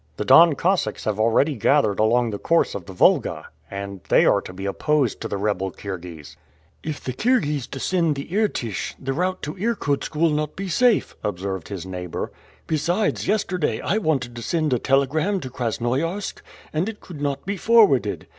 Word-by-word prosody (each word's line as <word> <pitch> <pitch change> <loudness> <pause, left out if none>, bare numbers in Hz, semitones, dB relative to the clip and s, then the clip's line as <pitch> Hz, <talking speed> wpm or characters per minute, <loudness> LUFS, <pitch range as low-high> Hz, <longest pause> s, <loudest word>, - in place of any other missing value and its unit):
The 105 - -3
Don 165 +6 +7
Cossacks 170 - 0
have 110 -1 -2
already 115 +7 +3
gathered 110 -3 +2
along 115 +2 +3
the 100 - -5
course 165 0 +2
of 95 -4 -7
the - - -7
Volga, 90 - +2 0.2
and 100 -1 -6
they - - +5
are - - +4
to - - -9
be 95 +2 -7
opposed 135 +5 0
to - - -3
the 100 - -3
rebel 100 -2 -1
Kirghiz." 90 -5 -8 0.4
"If 155 -2 -5
the 130 - -3
Kirghiz 150 - +1
descend 165 +3 0
the 140 - -6
Irtish, 120 - -1
the 135 0 -3
route 185 +5 -1
to 150 - -3
Irkutsk 185 -9 -1
will 165 +1 +3
not 150 0 -2
be 195 0 -5
safe," 245 +4 +2
observed 95 -3 -3
his 95 -3 -6
neighbor. 90 -2 -5 0.3
"Besides, 170 +7 0
yesterday 185 -5 0
I 210 - 0
wanted 135 - -1
to 120 - -6
send 155 +2 0
a 125 - +1
telegram 150 - +1
to 130 - -7
Krasnoiarsk, 130 - -2 0.3
and 165 +7 0
it 220 - -8
could 160 -6 -10
not 140 -1 -2
be 200 +2 -2
forwarded. 200 - +3
140 Hz, 180 wpm, -23 LUFS, 105-170 Hz, 0.4 s, Don